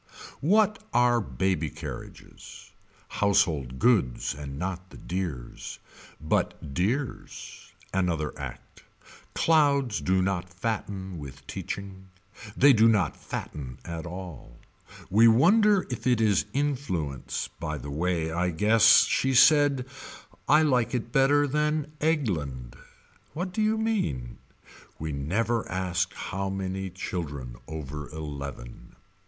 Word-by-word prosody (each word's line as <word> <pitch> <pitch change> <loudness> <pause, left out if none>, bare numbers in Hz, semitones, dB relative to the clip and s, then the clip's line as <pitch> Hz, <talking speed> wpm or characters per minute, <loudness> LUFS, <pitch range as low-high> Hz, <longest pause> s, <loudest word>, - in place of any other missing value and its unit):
What 210 +6 +2
are 120 -1 +4
baby 95 -6 -1
carriages - - -10 0.4
Household 85 -11 +1
goods 95 - +2
And 70 -1 -7
not 90 +2 -4
the - - -13
dears. 85 -10 -5 0.4
But 75 -1 -2
dears. 120 - -3 0.2
Another 85 -5 0
Act. - - -9 0.5
Clouds 140 -7 +3
do 95 0 +2
not 90 -2 -1
fatten 95 -5 -4
with 70 -1 -10
teaching. 95 +5 -6 0.5
They 140 +1 +7
do 115 -1 +5
not 105 -5 +2
fatten 65 -4 -6
at 85 0 -5
all. 85 -9 -9 0.5
We 110 +4 +6
wonder 195 - +5
if 125 - -4
it 125 -3 +3
is 105 -4 +3
influence 120 - -2
By 75 -2 -3
the 70 +1 -7
way 80 +1 -1
I 90 +2 0
guess. 105 +6 +6
She 135 0 +1
said. 145 -2 +5 0.6
I 150 +2 +6
like 125 -5 +2
it 120 -1 -3
better 140 +2 +4
than 150 +1 0
Eggland. 80 - -1 0.6
What 180 +3 -3
do 220 - -1
you 215 +1 +2
mean. 190 - -2 0.6
We 80 0 -4
never 100 +11 -1
asked 90 -1 -1
how 95 0 -3
many 95 0 -3
children 75 -9 -5
over 75 -2 -6
eleven. 70 -6 -8
95 Hz, 115 wpm, -27 LUFS, 80-130 Hz, 0.6 s, They